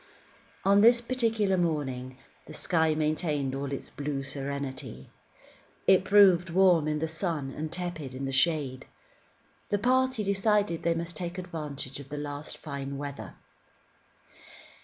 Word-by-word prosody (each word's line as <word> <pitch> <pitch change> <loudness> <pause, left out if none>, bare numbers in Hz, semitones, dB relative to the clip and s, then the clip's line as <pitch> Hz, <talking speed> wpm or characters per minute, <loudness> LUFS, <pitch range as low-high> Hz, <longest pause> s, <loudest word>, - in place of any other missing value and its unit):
On 200 +1 +5
this 235 +2 +7
particular 225 -5 +1
morning, 135 -7 -2 0.3
the 155 - -8
sky 160 -2 +2
maintained 150 -3 -1
all 140 0 -4
its 140 - -6
blue 140 -1 -3
serenity. 135 - -5 0.7
It 190 -1 +5
proved 190 -4 +6
warm 175 -3 +4
in 150 0 0
the 160 +2 -1
sun 160 -4 -1
and 155 +3 -5
tepid 170 -7 -5
in 135 +1 -4
the 135 - -3
shade. 135 -2 +1 0.8
The 205 - +2
party 255 +1 +2
decided 200 -3 +1
that 170 - 0
they 165 - +2
must 170 +1 -4
take 175 -1 -4
advantage 150 -7 -5
of 140 -1 -11
the 150 - -5
last 145 +1 -5
fine 140 -2 -6
weather. 140 0 -7
155 Hz, 140 wpm, -28 LUFS, 140-185 Hz, 0.8 s, this